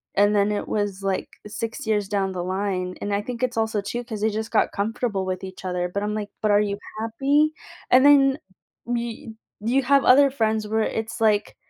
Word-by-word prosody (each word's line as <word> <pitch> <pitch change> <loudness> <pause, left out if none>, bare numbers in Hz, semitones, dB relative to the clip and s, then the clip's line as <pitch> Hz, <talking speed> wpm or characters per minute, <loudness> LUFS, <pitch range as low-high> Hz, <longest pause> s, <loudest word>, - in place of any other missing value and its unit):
and, 205 +1 +4
then 205 0 +3
it 205 - -2
was, 205 -2 -2
like, 195 -1 -2 0.2
6 225 +2 -5
years 210 -2 +1
down 195 -2 0
the 180 -1 -3
line 185 -1 -2
and 205 - -2
I 200 - +1
think 240 +2 -6
it's 250 -2 -1
also, 220 -1 0
too, 240 +5 -4
'cause 220 -4 -6
they 220 - +2
just 220 +1 -4
got 220 - +2
comfortable 210 -1 -2
with 185 0 -3
each 190 0 -9
other, 180 -1 -1
but 200 +2 -2
I'm 210 0 -2
like, 210 -1 -4
"But, 215 - +2
are 205 - +5
you 200 -1 -1 0.2
happy?" 275 +7 +1 0.4
And, 260 +2 +6
then, 275 -1 +6 0.5
y 235 -1 -4 0.3
you 250 +5 +1
have 275 +2 +3
other 280 +2 +7
friends 220 -4 0
where 220 +1 +1 0.2
it's, 225 +1 -6
like 210 -2 +2
215 Hz, 210 wpm, -24 LUFS, 200-235 Hz, 0.5 s, other